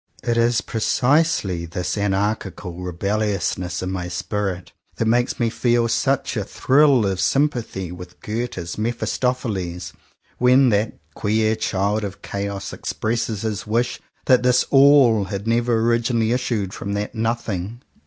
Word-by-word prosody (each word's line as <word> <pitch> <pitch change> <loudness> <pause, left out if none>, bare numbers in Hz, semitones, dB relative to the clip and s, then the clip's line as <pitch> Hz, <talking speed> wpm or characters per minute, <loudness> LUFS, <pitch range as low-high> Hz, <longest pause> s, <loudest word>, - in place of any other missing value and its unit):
It 120 - 0
is 115 0 +2
precisely 115 - +1
this 90 +1 -3
anarchical 100 -3 -2
rebellious 100 +3 -1
ness 90 0 -4
in 95 - -3
my 90 -2 -3
spirit 90 +1 -3 0.2
that 115 - -1
makes 120 +2 +1
me 115 -2 +1
feel 120 -1 +2
such 135 +3 0
a 105 - -1
thrill 135 +2 +3
of 95 -2 -1
sympathy 120 - 0
with 90 0 -10
Goethe's 105 -5 -4
Mephis 115 +2 -2
topheles, 100 -9 -2 0.5
when 125 +1 +5
that 105 0 0 0.2
queer 110 +3 +1
Child 105 0 -1
of 100 -1 -6
Chaos 100 -1 -4
expresses 110 -1 -2
his 105 -1 -3
wish 120 +3 0 0.3
that 130 -1 +5
this 125 0 +3
"All" 135 -6 +6
had 100 +1 -5
never 115 +1 +1
originally 115 0 +1
issued 115 -6 -1
from 100 - -5
that 100 0 -3
"Nothing." 115 -1 -3
110 Hz, 140 wpm, -22 LUFS, 95-120 Hz, 0.5 s, All